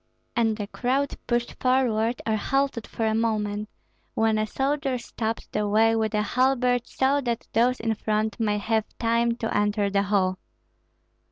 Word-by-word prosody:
And 225 -2 +2
the 205 - -3
crowd 260 +6 -1
pushed 240 0 -1
forward 245 -3 +1
or 220 - +1
halted 270 +1 0
for 225 - -3
a 220 - +2
moment, 215 -2 -1 0.5
when 220 -1 +2
a 215 - 0
soldier 275 +1 -1
stopped 225 -1 -4
the 210 0 0
way 225 +2 +4
with 220 -1 0
a 210 - +2
halbert 250 +1 +1
so 275 +2 +1
that 240 -2 -3
those 245 +2 +3
in 225 0 0
front 215 0 -1
might 210 -2 0
have 220 0 -1
time 230 0 +1
to 225 -1 -3
enter 205 -1 +1
the 200 0 +2
hall. 185 -2 +1
225 Hz, 165 wpm, -25 LUFS, 215-245 Hz, 0.5 s, way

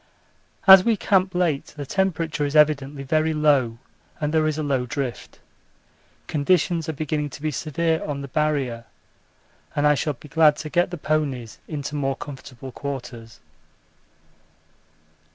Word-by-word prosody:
As 190 -1 +10
we 225 0 +2
camp 190 -1 +1
late 165 -7 -1
the 145 - -5
temperature 165 -3 -1
is 145 +1 -2
evidently 145 -2 +3
very 155 +3 +1
low 140 -7 +2 0.4
and 150 -1 -2
there 155 -1 +3
is 155 -1 -1
a 155 - -2
low 135 -4 0
drift. 135 -2 -5 0.9
Conditions 165 +2 +1
are - - -1
beginning 150 0 -2
to 140 - -10
be 155 +1 -2
severe 160 +3 -1
on 140 -2 -4
the - - -6
Barrier 140 -6 -1 0.9
and 145 - +1
I 150 - +6
shall 150 +1 -1
be 145 - -15
glad 155 0 +4
to 155 - -6
get 175 +1 +2
the 175 - -6
ponies 145 -7 -2
into 145 -2 -5
more 135 -2 -1
comfortable 135 -2 -9
quarters. 120 -4 -7
150 Hz, 150 wpm, -23 LUFS, 140-160 Hz, 0.9 s, As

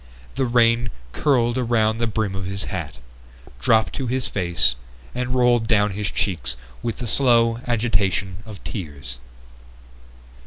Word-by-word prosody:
The 130 0 0
rain 120 0 +3 0.2
curled 125 - +2
around 115 -2 +1
the 115 - +1
brim 110 -2 -1
of 95 -1 -4
his 100 +1 -2
hat, 80 -6 -4 0.6
dropped 110 - +3
to 135 - -3
his 130 +1 +1
face, 85 -9 +1 0.4
and 125 0 -2
rolled 120 -2 +3
down 105 -2 +3
his 105 +1 -2
cheeks 85 -10 -1 0.2
with 115 -2 -3
the 125 - -4
slow 115 -1 +3
agitation 100 -5 0
of 105 -3 -10
tears. 70 - -6
110 Hz, 140 wpm, -22 LUFS, 95-120 Hz, 0.6 s, rain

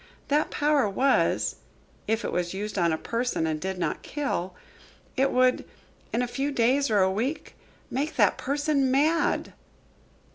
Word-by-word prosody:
That 295 +2 +2
power 290 -6 +2
was, 265 +7 +1 0.5
if 225 +1 0
it - - -2
was 175 +1 -2
used 205 0 -3
on 170 -1 +3
a 160 - 0
person 230 -3 -1
and 155 -1 -2
did 190 0 -3
not 180 - -2
kill 190 - -3 0.6
it 270 +1 +2
would, 255 0 +3 0.5
in 240 +2 0
a - - -1
few 275 +4 -2
days 270 +2 +2
or 210 -3 +3
a 190 - +2
week, 250 +11 -3 0.4
make 285 +4 -2
that - - +4
person 285 -1 0
mad." 300 +5 +1
250 Hz, 155 wpm, -26 LUFS, 195-280 Hz, 0.6 s, that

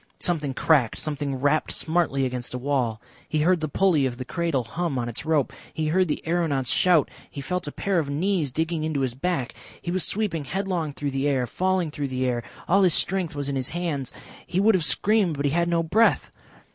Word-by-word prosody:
Something 150 -6 0
cracked, 140 -8 +3
something 145 -3 -3
rapped 145 +4 +1
smartly 160 -5 +1
against 125 -1 -3
a - - -1
wall. 125 -4 -1 0.3
He 155 - +1
heard 180 +3 +3
the 155 - -2
pulley 155 -3 +2
of 120 -2 -5
the 130 - -5
cradle 165 -4 -1
hum 165 +4 -3
on 120 -1 -1
its 120 +4 -5
rope. 145 -4 +1 0.2
He 155 -1 -1
heard 185 +3 +3
the 150 - -3
aeronauts 160 -7 +1
shout. 175 -6 +4 0.2
He - - -8
felt 180 +4 -3
a - - -3
pair 195 +2 0
of 145 -3 -2
knees 160 0 0
digging 160 +2 -1
into 155 -3 -1
his 130 -3 0
back.... 135 -2 -2 0.3
He 175 - -4
was 185 0 0
sweeping 190 -8 -1
headlong 180 -1 -2
through 145 0 -3
the 135 +1 0
air, 135 -3 +1
falling 185 +4 0
through 145 -1 -3
the 130 -1 -2
air. 120 -2 0 0.3
All 195 +3 +4
his 180 -4 +4
strength 180 -4 0
was 145 -1 -3
in 140 - -2
his 130 -1 -1
hands. 160 -7 -3 0.4
He 180 - 0
would 215 +3 +5
have 185 -4 +2
screamed 180 +5 +2
but 140 - -1
he 140 - +2
had 170 +2 +1
no 170 -1 +2
breath. 220 +8 +2
155 Hz, 220 wpm, -25 LUFS, 135-175 Hz, 0.4 s, would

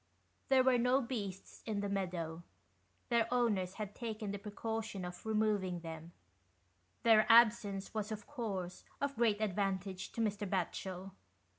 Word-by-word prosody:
There 265 -1 +6
were 255 -1 +4
no 250 +2 +4
beasts 205 -7 -5
in 210 -2 -1
the 205 - -1
meadow 175 -4 -2 0.4
— - - -39
^their 230 -1 +4
owners 210 -7 +1
had 210 -2 -5
taken 215 -3 -4
the 200 - -4
precaution 210 -1 -4
of 180 0 -8
removing 210 -5 +1
them; 165 0 -7 0.9
their 215 -2 +6
absence 220 -4 +5
was, 215 0 -2
of 210 -1 -5
course, 200 -10 -4 0.2
of 280 0 -1
great 220 -3 +2
advantage 195 -2 -1
to 230 - -2
Mr. 205 -2 -1
Batchel. 185 0 -3
205 Hz, 145 wpm, -35 LUFS, 190-225 Hz, 0.9 s, There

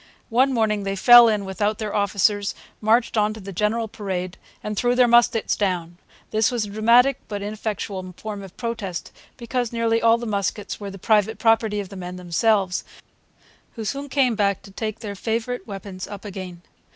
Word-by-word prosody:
One 260 +4 +4
morning 220 -4 +1
they 195 0 -2
fell 240 +4 +8
in 210 -3 0
without 205 +2 -1
their 215 -2 -4
officers, 200 0 +1 0.3
marched 225 +2 +2
on 215 0 +2
to - - -9
the 195 -1 -8
general 215 +4 0
parade, 185 -4 -4 0.3
and 210 0 -3
threw 245 +3 +1
their 250 -1 +5
muskets 235 -2 +3
down. 175 -4 -2 0.3
This 220 0 +2
was 240 -4 -1
a 205 - -9
dramatic 235 +5 +4
but 205 -2 -5
ineffectual 205 -3 -4
form 210 -2 -6
of 190 -2 -12
protest, 220 -7 -4 0.3
because 245 -1 -2
nearly 230 -1 +1
all 230 0 +5
the 240 - -6
muskets 205 -1 -2
were 200 -1 -6
the 195 - -9
private 215 +2 +2
property 225 -2 +2
of 200 -2 -5
the 200 - -10
men 180 -1 -6
themselves, 185 +2 +1 0.9
who 225 - -5
soon 280 +6 -4
came 260 -3 +2
back 200 -2 0
to 195 - -13
take 215 +2 -5
their 210 -3 -5
favourite 230 +5 -3
weapons 195 -2 -7
up 205 0 -9
again. 185 -3 -7
210 Hz, 185 wpm, -23 LUFS, 195-230 Hz, 0.9 s, fell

